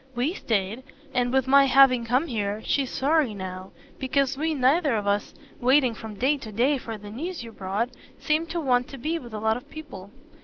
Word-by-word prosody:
WE 255 Hz, +8 st, 0 dB
stayed 220 Hz, -, -1 dB, 0.3 s
and, 245 Hz, -1 st, +1 dB
with 265 Hz, -1 st, +2 dB
my 275 Hz, +1 st, +6 dB
having 265 Hz, -2 st, +5 dB
come 255 Hz, +6 st, +2 dB
here, 215 Hz, -6 st, -3 dB
she's 275 Hz, -3 st, +1 dB
sorry 280 Hz, -5 st, +1 dB
now 185 Hz, 0 st, -6 dB, 0.3 s
because 270 Hz, 0 st, +1 dB
we 315 Hz, +3 st, -1 dB
neither 275 Hz, +1 st, +3 dB
of 210 Hz, -2 st, -2 dB
us, 205 Hz, 0 st, -1 dB, 0.2 s
waiting 255 Hz, 0 st, +4 dB
from 220 Hz, -1 st, -8 dB
day 270 Hz, +7 st, +2 dB
to 220 Hz, -5 st, -8 dB
day 255 Hz, +6 st, +2 dB
for 225 Hz, -2 st, -6 dB
the 205 Hz, 0 st, -10 dB
news 320 Hz, -, -5 dB
you 230 Hz, -, -9 dB
brought, 205 Hz, +4 st, -2 dB, 0.3 s
seemed 315 Hz, +1 st, 0 dB
to 340 Hz, -, -2 dB
want 250 Hz, -5 st, +1 dB
to 275 Hz, -, -9 dB
be 315 Hz, +6 st, -2 dB
with 240 Hz, -5 st, -11 dB
a 215 Hz, -, -5 dB
lot 220 Hz, +1 st, +1 dB
of 245 Hz, -, -13 dB
people." 275 Hz, -11 st, -10 dB
250 Hz, 205 wpm, -25 LUFS, 220-280 Hz, 0.3 s, my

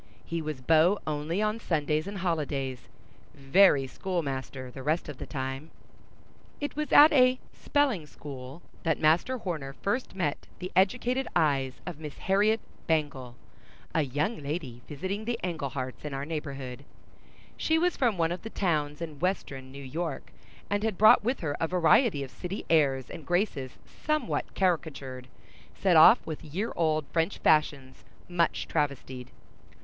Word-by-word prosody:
He 165 Hz, 0 st, -3 dB
was 155 Hz, -4 st, -5 dB
beau 160 Hz, +8 st, +4 dB
only 155 Hz, +6 st, -1 dB
on 215 Hz, +1 st, 0 dB
Sundays 155 Hz, -4 st, 0 dB
and 200 Hz, 0 st, -5 dB
holidays; 145 Hz, -8 st, -2 dB, 0.5 s
very 140 Hz, +1 st, +5 dB
schoolmaster 135 Hz, -5 st, -4 dB
the 135 Hz, -, -9 dB
rest 155 Hz, +5 st, 0 dB
of 150 Hz, -3 st, -7 dB
the -, -, -6 dB
time. 135 Hz, +2 st, -4 dB, 0.9 s
It 290 Hz, -, -4 dB
was 305 Hz, 0 st, -3 dB
at 300 Hz, +2 st, +9 dB
a 255 Hz, -2 st, +5 dB, 0.2 s
"spelling 265 Hz, -, 0 dB
school" 140 Hz, +1 st, -9 dB, 0.2 s
that 160 Hz, -3 st, +1 dB
Master 165 Hz, +12 st, +3 dB
Horner 155 Hz, -, -4 dB
first 205 Hz, -, -2 dB
met 155 Hz, -6 st, -2 dB
the 185 Hz, 0 st, -6 dB
educated 250 Hz, +7 st, +2 dB
eyes 135 Hz, -4 st, +1 dB
of 175 Hz, -4 st, -6 dB
Miss 150 Hz, -2 st, -8 dB
Harriet 210 Hz, +3 st, +2 dB, 0.3 s
Bangle, 140 Hz, -6 st, -1 dB, 0.6 s
a 160 Hz, -, +3 dB
young 150 Hz, -, -1 dB
lady 140 Hz, -5 st, -5 dB
visiting 190 Hz, +8 st, -4 dB
the 235 Hz, 0 st, -2 dB
Engleharts 140 Hz, -7 st, -4 dB
in 150 Hz, -2 st, -4 dB
our 135 Hz, +1 st, -3 dB
neighborhood. 140 Hz, -4 st, -5 dB, 0.7 s
She 320 Hz, -, +1 dB
was 355 Hz, +2 st, +2 dB
from 235 Hz, -7 st, +1 dB
one 165 Hz, -1 st, +1 dB
of 175 Hz, -, -4 dB
the 225 Hz, -, -7 dB
towns 155 Hz, -6 st, -1 dB
in 155 Hz, -3 st, -7 dB
Western 140 Hz, -8 st, -2 dB
New 140 Hz, +1 st, -9 dB
York, 160 Hz, +6 st, -4 dB, 0.4 s
and 205 Hz, 0 st, 0 dB
had 215 Hz, -3 st, -1 dB
brought 215 Hz, -1 st, +7 dB
with 250 Hz, +4 st, -1 dB
her 145 Hz, -4 st, -2 dB
a 165 Hz, -, +1 dB
variety 180 Hz, -, +3 dB
of 130 Hz, -, -9 dB
city 180 Hz, -, -6 dB
airs 135 Hz, -5 st, +2 dB
and 165 Hz, -, -8 dB
graces 175 Hz, -, -1 dB
somewhat 305 Hz, 0 st, -2 dB
caricatured, 140 Hz, -8 st, -1 dB, 0.5 s
set -, -, +2 dB
off -, -, +8 dB
with 155 Hz, -2 st, -6 dB
year 190 Hz, +10 st, -3 dB
old 155 Hz, -2 st, +1 dB
French 165 Hz, +3 st, +1 dB
fashions 145 Hz, -4 st, +1 dB, 0.2 s
much 170 Hz, -2 st, 0 dB
travestied. 130 Hz, -3 st, -2 dB
160 Hz, 155 wpm, -28 LUFS, 140-190 Hz, 0.9 s, at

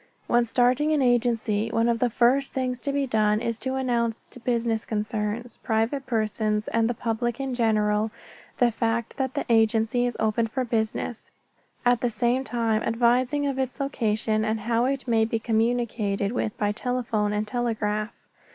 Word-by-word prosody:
When 240 Hz, 0 st, +3 dB
starting 250 Hz, +6 st, +2 dB
an 290 Hz, -3 st, +2 dB
agency 230 Hz, -3 st, +1 dB
one 230 Hz, +1 st, +1 dB
of 235 Hz, -1 st, +1 dB
the 245 Hz, -, +2 dB
first 250 Hz, +4 st, +2 dB
things 255 Hz, -2 st, -2 dB
to 280 Hz, -, -2 dB
be 280 Hz, 0 st, 0 dB
done 215 Hz, -3 st, +2 dB
is 230 Hz, -1 st, -3 dB
to 260 Hz, 0 st, -2 dB
announce 240 Hz, -3 st, -1 dB
to -, -, -10 dB
business 230 Hz, -2 st, 0 dB
concerns, 215 Hz, +2 st, -3 dB
private 235 Hz, +4 st, -1 dB
persons, 215 Hz, -2 st, 0 dB
and 230 Hz, 0 st, +1 dB
the 240 Hz, -, -1 dB
public 235 Hz, +1 st, -2 dB
in 270 Hz, -1 st, -2 dB
general 215 Hz, -2 st, +1 dB, 0.5 s
the 245 Hz, -1 st, +3 dB
fact 230 Hz, 0 st, -2 dB
that 265 Hz, -2 st, -2 dB
the -, -, -1 dB
agency 225 Hz, +1 st, +3 dB
is 245 Hz, -, -4 dB
open 220 Hz, +1 st, +1 dB
for 255 Hz, +3 st, -2 dB
business, 225 Hz, 0 st, -2 dB, 0.6 s
at 245 Hz, -1 st, +3 dB
the 245 Hz, -, +1 dB
same 245 Hz, +3 st, +1 dB
time 230 Hz, -4 st, 0 dB
advising 245 Hz, +5 st, +2 dB
of 275 Hz, -1 st, -1 dB
its 260 Hz, +1 st, -2 dB
location 220 Hz, -5 st, 0 dB
and 220 Hz, 0 st, -1 dB
how 230 Hz, +2 st, +1 dB
it 270 Hz, 0 st, -2 dB
may 225 Hz, -2 st, +3 dB
be 225 Hz, +1 st, 0 dB
communicated 225 Hz, -3 st, 0 dB
with 225 Hz, -3 st, -2 dB
by 205 Hz, -1 st, +1 dB
telephone 230 Hz, -2 st, -1 dB
and 210 Hz, 0 st, -1 dB
telegraph. 215 Hz, -2 st, -2 dB
230 Hz, 170 wpm, -25 LUFS, 220-245 Hz, 0.6 s, When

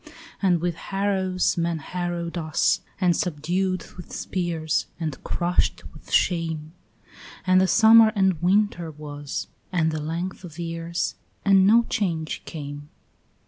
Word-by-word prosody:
And 180 Hz, -4 st, +3 dB
with 175 Hz, 0 st, 0 dB
harrows 190 Hz, 0 st, 0 dB
men 170 Hz, 0 st, 0 dB
harrowed 175 Hz, +2 st, -4 dB
us, 160 Hz, -3 st, +1 dB, 0.2 s
and 180 Hz, -3 st, +3 dB
subdued 180 Hz, +3 st, -1 dB
with 175 Hz, -, -10 dB
spears, 170 Hz, -4 st, -1 dB
And 155 Hz, -5 st, -4 dB
crushed 175 Hz, +1 st, 0 dB
with -, -, -15 dB
shame; 165 Hz, -3 st, +1 dB, 0.7 s
And 185 Hz, 0 st, +5 dB
the 190 Hz, -, +3 dB
summer 225 Hz, +1 st, +7 dB
and 190 Hz, -5 st, +2 dB
winter 185 Hz, -2 st, +2 dB
was, 145 Hz, -2 st, -6 dB, 0.3 s
and 160 Hz, -3 st, +2 dB
the 155 Hz, -1 st, -3 dB
length 170 Hz, +5 st, -4 dB
of 165 Hz, -3 st, -10 dB
years, 165 Hz, 0 st, -3 dB, 0.3 s
And 195 Hz, -1 st, +6 dB
no 230 Hz, +3 st, +6 dB
change 170 Hz, -9 st, -2 dB
came. 145 Hz, -2 st, -7 dB
175 Hz, 130 wpm, -24 LUFS, 160-185 Hz, 0.7 s, summer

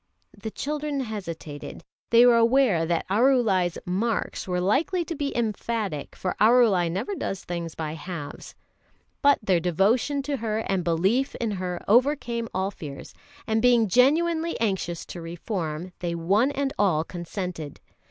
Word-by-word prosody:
The 220 Hz, +1 st, -6 dB
children 295 Hz, +3 st, -3 dB
hesitated. 170 Hz, -, -7 dB, 0.3 s
They 235 Hz, +1 st, +7 dB
were 240 Hz, -1 st, +6 dB
aware 230 Hz, -8 st, +3 dB
that 170 Hz, -1 st, -1 dB
Arulai's 205 Hz, -5 st, +2 dB
"marks" 205 Hz, +5 st, -2 dB
were 180 Hz, -1 st, 0 dB
likely 310 Hz, -, +1 dB
to 335 Hz, -, -4 dB
be 285 Hz, -2 st, -2 dB
emphatic, 215 Hz, -7 st, -2 dB
for 185 Hz, -, -3 dB
Arulai 215 Hz, -6 st, +5 dB
never 200 Hz, -, -3 dB
does 195 Hz, -, -4 dB
things 170 Hz, -2 st, -5 dB
by 155 Hz, -1 st, -4 dB
halves. 160 Hz, -2 st, -7 dB, 0.7 s
But 285 Hz, 0 st, +5 dB
their 185 Hz, -4 st, +3 dB
devotion 215 Hz, -, +1 dB
to 285 Hz, 0 st, -2 dB
her 220 Hz, -2 st, -2 dB
and 190 Hz, -2 st, 0 dB
belief 190 Hz, +11 st, +1 dB
in 230 Hz, -2 st, -2 dB
her 180 Hz, -3 st, -4 dB
overcame 240 Hz, -1 st, +2 dB
all 190 Hz, +1 st, -1 dB
fears; 145 Hz, -7 st, -9 dB, 0.3 s
and 220 Hz, 0 st, +1 dB
being 240 Hz, -2 st, +4 dB
genuinely 320 Hz, -, +2 dB
anxious 190 Hz, -6 st, -1 dB
to 175 Hz, -, -8 dB
reform, 170 Hz, 0 st, -4 dB
they 170 Hz, -1 st, -2 dB
one 200 Hz, +10 st, +2 dB
and 280 Hz, -1 st, -2 dB
all 180 Hz, -7 st, +3 dB
consented. 175 Hz, -3 st, -6 dB
205 Hz, 145 wpm, -25 LUFS, 175-245 Hz, 0.7 s, They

